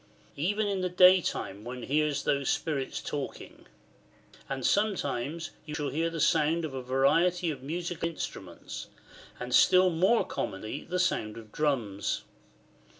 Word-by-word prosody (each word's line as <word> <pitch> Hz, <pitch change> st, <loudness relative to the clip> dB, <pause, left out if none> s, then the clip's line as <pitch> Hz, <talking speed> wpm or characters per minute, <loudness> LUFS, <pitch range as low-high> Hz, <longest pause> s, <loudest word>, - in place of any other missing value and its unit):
"] -, -, -30 dB
Even 205 Hz, +8 st, 0 dB
in 200 Hz, -2 st, -1 dB
the 180 Hz, -, 0 dB
day 180 Hz, +1 st, +7 dB
time 100 Hz, -, -4 dB
one 125 Hz, +1 st, -6 dB
hears 150 Hz, +1 st, +1 dB
those 140 Hz, -2 st, +1 dB
spirits 140 Hz, -4 st, -1 dB
talking. 145 Hz, -2 st, -6 dB, 0.8 s
And 135 Hz, -2 st, -3 dB
sometimes 165 Hz, -, 0 dB
you 150 Hz, -1 st, -6 dB
shall 150 Hz, -2 st, -2 dB
hear 165 Hz, +3 st, 0 dB
the 165 Hz, 0 st, -5 dB
sound 160 Hz, +2 st, +2 dB
of 150 Hz, -, -6 dB
a 130 Hz, -, -4 dB
variety 165 Hz, +7 st, +2 dB
of 135 Hz, -4 st, -7 dB
musical 165 Hz, +3 st, -3 dB
instruments, 95 Hz, -, -7 dB, 0.5 s
and 125 Hz, 0 st, -5 dB
still 185 Hz, +3 st, +6 dB
more 190 Hz, +8 st, +3 dB
commonly 100 Hz, +3 st, -4 dB
the 180 Hz, -, -2 dB
sound 115 Hz, -12 st, 0 dB
of 110 Hz, -2 st, -11 dB
drums. 115 Hz, -10 st, -1 dB
150 Hz, 150 wpm, -29 LUFS, 130-175 Hz, 0.8 s, day